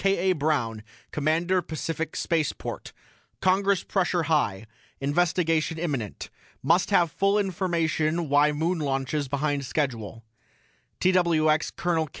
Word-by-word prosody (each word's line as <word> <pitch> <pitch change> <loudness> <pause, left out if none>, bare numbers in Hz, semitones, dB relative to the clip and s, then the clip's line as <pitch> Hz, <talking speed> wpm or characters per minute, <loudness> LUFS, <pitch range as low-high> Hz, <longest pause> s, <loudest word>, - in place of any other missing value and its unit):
K. 190 -1 +2
A. - - +1
BROWN 140 -8 -1 0.3
COMMANDER 165 +5 +1
PACIFIC 165 0 -4
SPACEPORT: 160 -3 -2 0.5
CONGRESS 195 0 +2
PRESSURE 180 -3 0
HIGH 145 -11 0 0.3
INVESTIGATION 165 +2 +1
IMMINENT 140 - -4 0.3
MUST 175 +3 +3
HAVE 175 -5 +3
FULL 195 +4 +2
INFORMATION 170 -4 0
WHY 145 +1 +4
MOON 165 +4 -1
LAUNCHES 140 0 -1
BEHIND 140 +1 -1
SCHEDULE 120 -5 -3 0.8
TWX 165 -4 +2
COL. 165 -3 0
160 Hz, 110 wpm, -26 LUFS, 145-175 Hz, 0.8 s, WHY